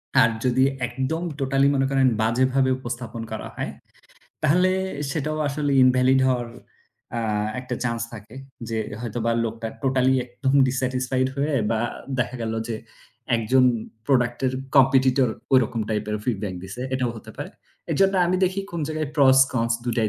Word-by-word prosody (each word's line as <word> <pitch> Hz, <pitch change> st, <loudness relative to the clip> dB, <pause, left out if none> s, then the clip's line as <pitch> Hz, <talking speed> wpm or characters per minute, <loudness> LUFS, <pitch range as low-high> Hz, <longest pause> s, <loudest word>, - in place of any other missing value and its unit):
আর, 115 Hz, -, +6 dB, 0.2 s
যদি 125 Hz, +1 st, +3 dB, 0.2 s
একদম 135 Hz, +7 st, -3 dB, 0.2 s
টোটালি 135 Hz, 0 st, +2 dB
মনে 135 Hz, 0 st, +2 dB
করেন, 135 Hz, -1 st, +4 dB
বাজেভাবে 130 Hz, +4 st, +2 dB
উপস্থাপন 120 Hz, -2 st, -6 dB
করা 110 Hz, -, -5 dB
হয়, -, -, -3 dB, 0.7 s
তাহলে 180 Hz, +5 st, +4 dB, 0.4 s
সেটাও 155 Hz, 0 st, -2 dB
আসলে 145 Hz, 0 st, -1 dB
ইনভ্যালিড 130 Hz, +1 st, +4 dB
হওয়ার 125 Hz, -2 st, 0 dB, 0.7 s
আ -, -, -1 dB, 0.4 s
একটা 125 Hz, -, -5 dB
চান্স 115 Hz, -1 st, -1 dB
থাকে 110 Hz, +2 st, -11 dB, 0.3 s
যে, 115 Hz, -, -2 dB, 0.2 s
হয়তোবা 115 Hz, 0 st, -2 dB
লোকটা 115 Hz, 0 st, -4 dB
টোটালি 130 Hz, 0 st, +2 dB
একদম 130 Hz, +2 st, -2 dB, 0.2 s
ডিস্স্যাটিসফাইড 130 Hz, 0 st, 0 dB
হয়ে 145 Hz, +2 st, 0 dB, 0.2 s
বা 110 Hz, -1 st, +1 dB, 0.4 s
দেখা 125 Hz, +1 st, -1 dB
গেল 110 Hz, 0 st, -2 dB, 0.2 s
যে, 115 Hz, -, -2 dB, 0.6 s
একজন 125 Hz, +4 st, +3 dB, 0.4 s
প্রোডাক্ট-এর 125 Hz, -1 st, +1 dB, 0.2 s
কম্পেটিটর, 130 Hz, -1 st, +5 dB, 0.2 s
ওইরকম 120 Hz, -3 st, +3 dB
টাইপ-এর 105 Hz, 0 st, -1 dB
ফীডব্যাক 105 Hz, -5 st, -2 dB
দিছে, 95 Hz, +6 st, -8 dB
এটাও 130 Hz, -2 st, 0 dB
হতে 110 Hz, -, -11 dB
পারে। -, -, -6 dB, 0.4 s
এজন্য 195 Hz, 0 st, +3 dB
আমি 185 Hz, +1 st, +1 dB
দেখি, 190 Hz, +2 st, -1 dB
কোন 170 Hz, -, -3 dB
জায়গায় 155 Hz, -2 st, -2 dB
প্রস 135 Hz, -2 st, +6 dB
কন্স, 115 Hz, -1 st, +1 dB
২ 120 Hz, -, -1 dB
টাই 110 Hz, -1 st, +2 dB
130 Hz, 145 wpm, -24 LUFS, 115-135 Hz, 0.7 s, আর